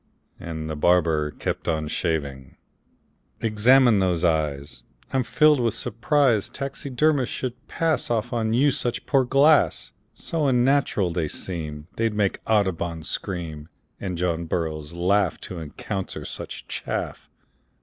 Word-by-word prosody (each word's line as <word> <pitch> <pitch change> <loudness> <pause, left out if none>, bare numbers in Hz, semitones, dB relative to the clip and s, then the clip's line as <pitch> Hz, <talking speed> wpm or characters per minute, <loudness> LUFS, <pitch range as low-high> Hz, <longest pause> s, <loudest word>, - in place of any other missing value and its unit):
And 80 -2 -5
the 80 - -3
barber 80 -2 +2
kept - - -4
on 80 -1 0
shaving. 70 -6 -3 0.8
"Examine 115 +1 +5
those 90 -3 +1
eyes. 75 -6 -1 0.3
I'm 130 - +3
filled 150 +4 +4
with 115 -3 +1
surprise 125 -1 +1
Taxidermists 135 0 0
should 125 -1 -5
pass 165 -2 0
Off 120 0 -1
on 110 -2 0
you 135 +5 +4
such 120 -1 -3
poor 135 -2 +3
glass; 140 +4 +4 0.2
So 155 +4 -1
unnatural 125 -7 +2
they 80 -2 -1
seem 75 -3 -5
They'd 115 -1 0
make 100 -2 +1
Audubon 90 -6 0
scream, 80 -4 -4 0.3
And 90 -3 -4
John 85 -1 -1
Burroughs 80 -2 -3
laugh 95 +2 +1
To 90 - -7
encounter 95 +5 -5
such - - -7
chaff. - - -4
100 Hz, 130 wpm, -24 LUFS, 80-125 Hz, 0.8 s, Examine